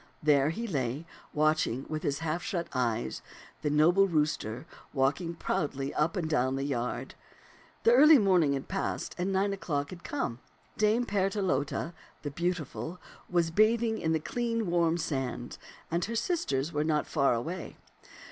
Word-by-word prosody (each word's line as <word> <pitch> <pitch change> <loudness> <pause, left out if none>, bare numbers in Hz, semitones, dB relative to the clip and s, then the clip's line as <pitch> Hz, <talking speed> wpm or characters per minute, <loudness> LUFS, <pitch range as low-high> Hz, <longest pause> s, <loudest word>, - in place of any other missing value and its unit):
There 145 -1 +4
he 225 +9 -3
lay, 140 - -2 0.3
watching 155 -4 +1
with 155 -1 -3
his 140 -1 -1
half 160 +2 -1
shut 170 -1 -2
eyes 115 - -1 0.4
the 150 - 0
noble 170 +7 +5
rooster 150 - -1 0.3
walking 150 +5 0
proudly 145 -6 -2
up 155 +2 +1
and 170 -3 -1
down 130 -4 +1
the 135 - -2
yard. 125 -4 -2 0.7
The 230 - +6
early 300 +4 +8
morning 180 - +4
had 135 -1 -3
passed 195 +1 -2
and 185 +2 0
nine 195 +1 +1
o'clock 145 -7 -2
had 180 -1 -9
come. 200 - -3 0.4
Dame 215 +3 +2
Partelote, 190 - 0 0.3
the 145 - -3
beautiful, 170 +1 -3 0.3
was 170 -2 +1
bathing 220 +3 +3
in 160 - 0
the 160 - +2
clean, 230 +5 -1
warm 170 -1 +3
sand, 135 -6 -3 0.3
and 170 +1 +1
her 230 - -4
sisters 170 - -1
were 150 0 +1
not 155 -1 +1
far 140 -5 +2
away. 165 +11 -5
160 Hz, 155 wpm, -30 LUFS, 140-190 Hz, 0.7 s, early